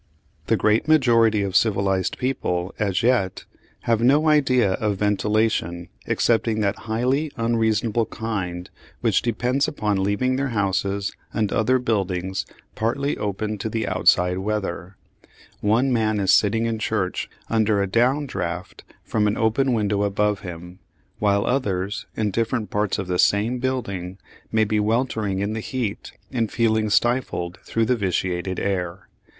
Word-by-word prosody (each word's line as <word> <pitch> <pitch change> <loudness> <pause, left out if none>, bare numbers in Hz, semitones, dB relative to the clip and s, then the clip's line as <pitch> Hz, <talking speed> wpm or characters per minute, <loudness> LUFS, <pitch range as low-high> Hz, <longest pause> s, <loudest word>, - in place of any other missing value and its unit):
The - - +3
great 110 +6 +2
majority 115 -8 +4
of 95 -1 -3
civilised 95 -3 +1
people, 95 -8 -2
as 100 -2 0
yet, 115 -7 +1 0.4
have 115 -1 +1
no 145 +6 +4
idea 130 -8 +3
of 105 0 -1
ventilation 105 -4 0 0.2
excepting 115 -1 +1
that 100 0 +1
highly 130 +7 0
unreasonable 115 -1 +1
kind 90 -6 -4 0.3
which - - +2
depends 125 +4 0
upon 105 -10 -1
leaving 115 +7 +1
their 140 0 0
houses 100 0 0 0.2
and 105 -2 0
other 125 +4 +3
buildings 95 -5 -1 0.3
partly 140 +6 -1
open 105 +1 -3
to 110 - -3
the 110 0 -2
outside 90 +1 +3
weather. 95 -2 -3 0.6
One 120 +6 +2
man 110 -2 +1
is 95 -2 +2
sitting 110 +2 +3
in 115 -1 -1
church 105 -4 -2 0.2
under 110 -2 +2
a 100 - +2
down 125 +9 +2
draught 90 -7 -5 0.2
from 105 -1 0
an 105 - 0
open 120 +4 +2
window 105 -3 +1
above 105 0 +1
him, 90 0 -9 0.4
while 100 -1 +2
others, 105 -3 -1
in 105 -2 0
different 115 +1 -1
parts 105 -1 0
of 95 - -3
the 90 0 -2
same 110 +5 +2
building, 100 -8 -3 0.3
may 110 0 +3
be 105 0 0
weltering 110 -3 0
in 100 +2 -1
the 110 - -3
heat 115 -2 -4 0.2
and 115 -4 -1
feeling 110 -2 +1
stifled 105 -6 0
through 115 0 0
the 125 - +2
vitiated 95 -3 -1
air. 90 -1 -3
105 Hz, 145 wpm, -23 LUFS, 95-115 Hz, 0.6 s, majority